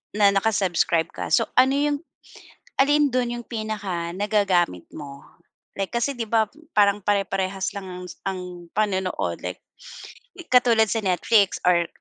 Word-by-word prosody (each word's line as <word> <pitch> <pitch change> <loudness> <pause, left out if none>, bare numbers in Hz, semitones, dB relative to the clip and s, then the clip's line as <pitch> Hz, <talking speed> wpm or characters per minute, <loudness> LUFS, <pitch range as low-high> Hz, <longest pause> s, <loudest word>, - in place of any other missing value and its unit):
na 205 -1 +5
naka-subscribe 190 -5 +1
ka - - -5
so, 230 - +3
ano 260 +1 +5
yung 290 0 +1 0.8
alin 290 0 +4
dun 245 -1 0
yung 240 -1 -6
pinaka 205 -7 -4
nagagamit 190 - +1
mo? 140 -2 -9 0.5
Like 195 -1 -3
kasi 275 +4 -1
'di 235 -2 -3
ba 220 -1 +3 0.2
parang 205 -3 +3
pare-parehas 195 -1 -1
lang 195 -1 -6
ang 180 0 -7 0.2
ang 190 -1 -3 0.3
panonood 190 -3 -1
like, - - -5 1.0
katulad 230 -3 +5
sa 225 -2 -1
Netflix 195 +2 +2
or 170 -1 +4
205 Hz, 135 wpm, -24 LUFS, 185-230 Hz, 1.0 s, na